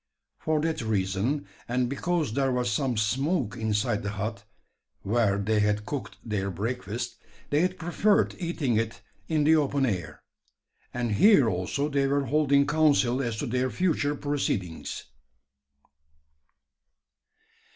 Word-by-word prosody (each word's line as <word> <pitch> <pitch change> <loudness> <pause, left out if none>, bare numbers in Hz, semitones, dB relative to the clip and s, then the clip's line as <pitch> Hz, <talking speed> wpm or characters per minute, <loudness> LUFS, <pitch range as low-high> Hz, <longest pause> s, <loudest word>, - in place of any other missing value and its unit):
For 155 -1 0
that 160 -2 -1
reason, 110 +6 -1 0.2
and 125 +1 0
because 155 0 -1
there 135 +1 +1
was 125 -1 0
some 125 +1 0
smoke 125 - 0
inside 105 -1 0
the 105 - -3
hut, 105 0 -4 0.6
where 105 -1 +2
they 105 +2 +1
had 105 0 +1
cooked 145 +1 -5
their 100 -3 -2
breakfast, 115 +4 -4 0.3
they 145 +2 +3
had 185 +1 0
preferred 185 +5 +2
eating 160 - -1
it 115 +1 -2 0.3
in 155 -2 +1
the 160 +2 +5
open 140 -2 +2
air; 90 -9 -3 0.7
and 120 -2 -2
here 145 - +6
also 95 +9 -1
they 140 -2 +1
were 140 0 +1
holding 140 +1 +3
council 140 -5 +3
as 120 -4 -2
to 145 - -2
their 130 +1 0
future 145 - 0
proceedings. 135 - -3
125 Hz, 130 wpm, -27 LUFS, 105-145 Hz, 0.7 s, here